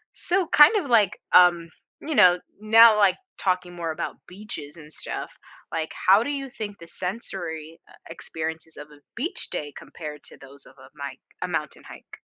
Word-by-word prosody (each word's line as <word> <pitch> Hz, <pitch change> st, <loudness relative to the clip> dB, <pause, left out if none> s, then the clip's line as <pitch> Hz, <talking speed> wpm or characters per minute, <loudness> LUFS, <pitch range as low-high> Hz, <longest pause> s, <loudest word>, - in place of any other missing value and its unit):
So, 360 Hz, -1 st, 0 dB
kind 300 Hz, +9 st, +7 dB
of, 370 Hz, -9 st, 0 dB
like, 210 Hz, -4 st, +3 dB
um, 175 Hz, -2 st, +5 dB, 0.3 s
you 310 Hz, -2 st, -4 dB
know, 180 Hz, -4 st, +6 dB, 0.2 s
now, 220 Hz, 0 st, +7 dB
like, 200 Hz, -3 st, +4 dB, 0.2 s
talking 180 Hz, -2 st, -1 dB
more 165 Hz, -2 st, -3 dB
about -, -, -5 dB
beaches 180 Hz, -6 st, -8 dB
and 155 Hz, -2 st, -14 dB
stuff, -, -, -6 dB, 0.4 s
like, 160 Hz, -1 st, -3 dB
how 200 Hz, +4 st, +7 dB
do 285 Hz, -, -3 dB
you 275 Hz, -2 st, -4 dB
think 210 Hz, -5 st, -7 dB
the 170 Hz, -, -12 dB
sensory, 170 Hz, -5 st, -6 dB
uh, -, -, -19 dB, 0.2 s
experiences 160 Hz, 0 st, -6 dB
of 150 Hz, 0 st, -10 dB
a 145 Hz, -1 st, -18 dB
beach 285 Hz, +10 st, -4 dB
day 145 Hz, -1 st, -5 dB
compared 150 Hz, 0 st, -10 dB
to -, -, -10 dB
those 135 Hz, +1 st, -14 dB
of -, -, -18 dB
a 130 Hz, 0 st, -15 dB
mic 140 Hz, -1 st, -7 dB, 0.2 s
a -, -, -2 dB
mountain -, -, -4 dB
hike? -, -, -13 dB
180 Hz, 180 wpm, -24 LUFS, 160-215 Hz, 0.4 s, kind